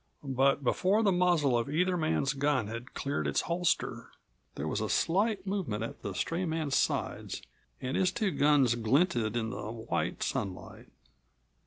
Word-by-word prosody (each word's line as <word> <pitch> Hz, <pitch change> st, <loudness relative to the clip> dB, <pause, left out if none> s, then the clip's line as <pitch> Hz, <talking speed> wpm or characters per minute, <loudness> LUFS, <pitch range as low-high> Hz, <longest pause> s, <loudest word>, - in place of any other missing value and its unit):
But 135 Hz, +2 st, +3 dB
before 190 Hz, -, +2 dB
the 200 Hz, -, +4 dB
muzzle 175 Hz, -7 st, +3 dB
of 120 Hz, +3 st, 0 dB
either 180 Hz, +5 st, +1 dB
man's 155 Hz, -4 st, +1 dB
gun 140 Hz, -3 st, +1 dB
had 115 Hz, +4 st, -7 dB
cleared 140 Hz, +1 st, -2 dB
its -, -, +1 dB
holster, 175 Hz, +1 st, -1 dB, 0.5 s
there 75 Hz, -, -3 dB
was 105 Hz, -, -1 dB
a 110 Hz, -, -2 dB
slight 200 Hz, +3 st, +1 dB
movement 180 Hz, -, -2 dB
at 115 Hz, -, -7 dB
the 100 Hz, -2 st, -5 dB
stray 170 Hz, -, -1 dB
man's 160 Hz, -4 st, -1 dB
sides -, -, -1 dB, 0.4 s
and 130 Hz, -, -3 dB
his 185 Hz, -1 st, +2 dB
two 215 Hz, -2 st, 0 dB
guns 145 Hz, -6 st, +4 dB
glinted 120 Hz, -, +1 dB
in 110 Hz, -1 st, -2 dB
the 110 Hz, -3 st, -5 dB
white 115 Hz, 0 st, -2 dB
sunlight. 95 Hz, -3 st, -4 dB
140 Hz, 160 wpm, -30 LUFS, 115-180 Hz, 0.5 s, the